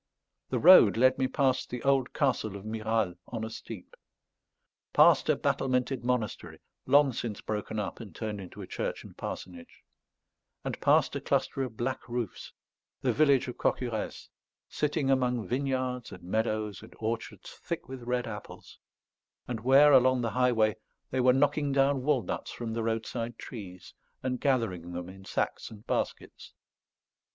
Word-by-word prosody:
The - - 0
road 160 - +8
led 130 +2 +4
me 130 - +2
past 130 -2 +1
the 125 -1 -5
old 135 -2 +2
castle 125 -8 0
of 100 +1 -9
Miral 110 -3 -1
on 115 -2 -5
a 110 - -4
steep; 110 -4 -9 1.0
past - - +5
a - - +5
battlemented 125 -1 0
monastery, 125 -4 -2 0.3
long 140 0 +5
since 110 -3 -4
broken 110 0 -4
up 105 -2 -3
and 100 -7 -10
turned 105 -3 -4
into 90 - -9
a - - -6
church - - -4
and - - -13
parsonage; 85 -2 -8 0.8
and - - -4
past - - +3
a - - -3
cluster 135 - 0
of 125 -4 -4
black 130 +1 -3
roofs, 120 -4 -4 0.5
the - - +2
village 140 -4 +4
of 125 - -6
Cocurès, 115 -4 -2 0.4
sitting 150 -2 0
among 125 -5 +1
vineyards 130 -1 -2
and 90 - -11
meadows 110 +1 -1
and - - -14
orchards 110 -3 -4
thick 170 - -6
with 130 -1 -8
red 125 +1 -1
apples, 105 -2 -9 0.7
and 120 -3 -3
where, 135 +5 +6
along 130 -1 +5
the 115 -2 -1
highway, 115 -5 +2 0.3
they 130 - 0
were 125 0 +5
knocking 145 +2 +2
down 135 0 +2
walnuts 135 -3 -1
from 115 -2 -5
the 115 - -2
roadside 115 +1 -3
trees, 95 -6 -9 0.3
and 125 -1 -2
gathering 100 - 0
them 90 +1 -5
in 95 +1 -12
sacks - - -2
and 110 -1 -13
baskets. - - -4
120 Hz, 155 wpm, -29 LUFS, 110-130 Hz, 1.0 s, road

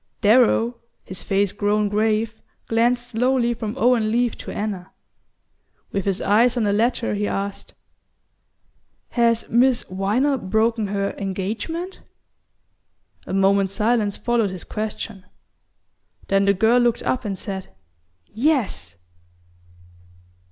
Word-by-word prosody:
Darrow, 235 +1 +4 0.2
his 185 - -6
face 200 0 +1
grown 205 +1 +1
grave, 215 +2 +1 0.3
glanced 240 +2 +1
slowly 245 +1 +1
from 225 0 -5
Owen 235 -3 +3
Leath 240 0 +1
to - - -8
Anna. 200 -4 -4 1.0
With 195 -2 -2
his 195 -1 0
eyes 230 +5 +3
on 235 - +1
the 205 -1 +2
latter 230 +2 +1
he 205 0 -1
asked: 200 0 -4 1.3
"Has 230 -1 +1
Miss 245 +1 +3
Viner 215 +9 +1
broken 220 +2 +1
her 200 0 -1
engagement?" 215 - -4 1.3
A - - -4
moment's 195 0 +2
silence 215 -2 +1
followed 235 -4 +1
his 185 -1 -7
question; 215 -2 -5 1.1
then 195 0 +3
the 200 - +4
girl 225 +5 +4
looked 240 -1 +1
up 255 - -1
and 200 -3 -3
said: 190 0 -5 0.6
"Yes!" 220 - -1
215 Hz, 115 wpm, -22 LUFS, 200-240 Hz, 1.3 s, Darrow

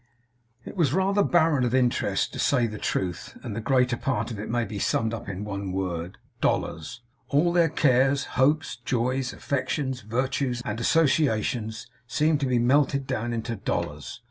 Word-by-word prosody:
It - - -8
was 155 -8 +2
rather 195 +2 +2
barren 160 -8 +3
of 120 +1 +1
interest, 125 -2 +1
to - - -6
say 125 -4 +3
the 110 -2 -5
truth; 90 -2 -3
and - - -5
the 115 - -3
greater 125 0 +2
part 130 -1 -1
of 110 - -5
it 105 - -5
may 120 0 0
be 100 0 -6
summed 110 +3 0
up 110 -3 -6
in 100 +1 -5
one 100 -2 -4
word. 90 -2 -3 0.2
Dollars. 85 +10 -1 0.3
All 170 +5 +3
their 170 -2 +4
cares, 135 -2 +3
hopes, 145 +1 +2
joys, 125 +2 -1
affections, 130 -2 -2
virtues, 125 +2 -1
and 105 +2 -3
associations, 120 -5 +1 0.2
seemed 150 +4 +2
to 140 - 0
be 125 -1 +2
melted 140 +3 +2
down 120 -3 -2
into 115 0 -3
dollars. 85 +4 -4
125 Hz, 170 wpm, -26 LUFS, 110-140 Hz, 0.3 s, their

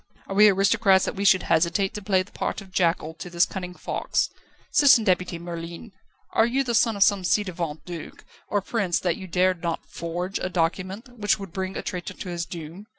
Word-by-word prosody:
Are - - -6
we 210 +2 +7
aristocrats 195 0 +4
that - - -2
we 200 - -3
should 190 -1 +5
hesitate 170 +4 +1
to 210 - -6
play 190 -2 +2
the 195 - -20
part - - -3
of 195 -2 -13
jackal 165 -3 +1
to 180 - -6
this 175 0 +3
cunning 180 -2 -6
fox? - - -1 0.4
Citizen 280 -6 +6
Deputy 180 -3 +1
Merlin, 170 +4 -7 0.4
are 225 - +4
you 265 +3 +1
the 240 -2 -2
son 225 -1 +3
of 200 - +5
some 200 -1 +3
ci 205 +4 +2
devant 170 -5 -5
duke 175 -3 -8 0.2
or 205 - 0
prince 195 -4 0
that 175 -3 0
you 190 - -8
dared 180 0 +1
not 170 -1 -3
forge 175 +3 -4
a 185 - -2
document 190 +8 -2
which 205 0 +2
would 195 -4 -9
bring 190 0 -3
a - - -4
traitor 180 0 -5
to 185 - -7
his 170 -1 -3
doom? 170 +4 -8
185 Hz, 210 wpm, -25 LUFS, 175-200 Hz, 0.4 s, we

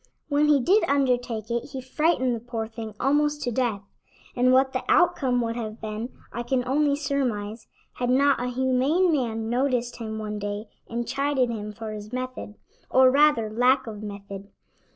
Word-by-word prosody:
When 290 +1 +3
he 295 -2 +5
did 380 - +3
undertake 245 -5 0
it 235 +3 -3
he 265 - -3
frightened 260 -1 +1
the - - -5
poor 230 -1 -4
thing 220 -1 -8
almost 295 +2 +1
to 245 - -1
death, 230 -5 -1 0.5
and 250 +1 +3
what 265 +1 +4
the 255 - -2
outcome 275 -8 +3
would 230 0 -2
have 220 -2 -5
been 220 +2 -5 0.2
I 240 - -3
can 250 +1 -1
only 285 +2 +2
surmise, 240 -7 -2 0.3
had 245 0 -2
not 275 +1 +3
a 250 - -1
humane 260 +8 +2
man 225 -6 -1
noticed 245 0 0
him 220 -2 -5
one 210 -1 -4
day 205 +1 -4 0.2
and 235 0 -3
chided 275 -2 0
him 210 -2 -5
for 220 +1 -7
his 210 0 -8
method, 255 -4 -5 0.3
or 260 0 +6
rather 290 -5 +4
lack 255 +4 +3
of 215 -2 -7
method. 200 -1 -8
245 Hz, 175 wpm, -25 LUFS, 220-270 Hz, 0.5 s, or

